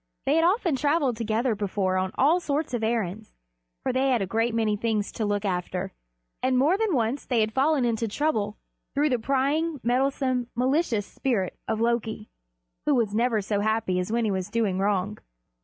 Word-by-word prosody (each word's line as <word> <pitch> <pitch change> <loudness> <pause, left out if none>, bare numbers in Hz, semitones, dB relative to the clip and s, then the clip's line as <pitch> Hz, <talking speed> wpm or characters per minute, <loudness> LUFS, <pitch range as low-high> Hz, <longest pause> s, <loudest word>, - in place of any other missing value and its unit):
They 280 - +3
had 325 +1 +3
often 355 - +2
traveled 285 -1 +1
together 230 +2 0
before 200 -2 -1
on 185 0 0
all 310 +7 +4
sorts 295 -4 -2
of 235 -2 -1
errands, 220 -2 -2 0.5
for 260 - 0
they 265 +1 +2
had 250 -3 +3
a 195 - 0
great 225 +4 0
many 220 -2 +1
things 215 -1 -1
to 220 - -3
look 205 0 -1
after, 180 0 -2 0.5
and 255 0 +2
more 295 +8 +4
than 420 -5 +1
once 240 +3 0
they 245 -3 0
had 215 0 0
fallen 275 -1 +2
into 230 -1 0
trouble 215 -4 -1 0.4
through 295 +2 +3
the 250 -3 +1
prying, 280 +5 0
meddlesome, 255 0 +1
malicious 255 - +1
spirit 210 -9 -2
of 220 -1 -1
Loki, 225 -2 -1 0.6
who 295 - +4
was 225 -5 +1
never 230 -1 +2
so 200 +1 -1
happy 215 -3 0
as 180 +3 -3
when 235 0 +1
he 210 - +1
was 190 0 -2
doing 205 -4 0
wrong. 200 +1 0
230 Hz, 190 wpm, -26 LUFS, 210-270 Hz, 0.6 s, all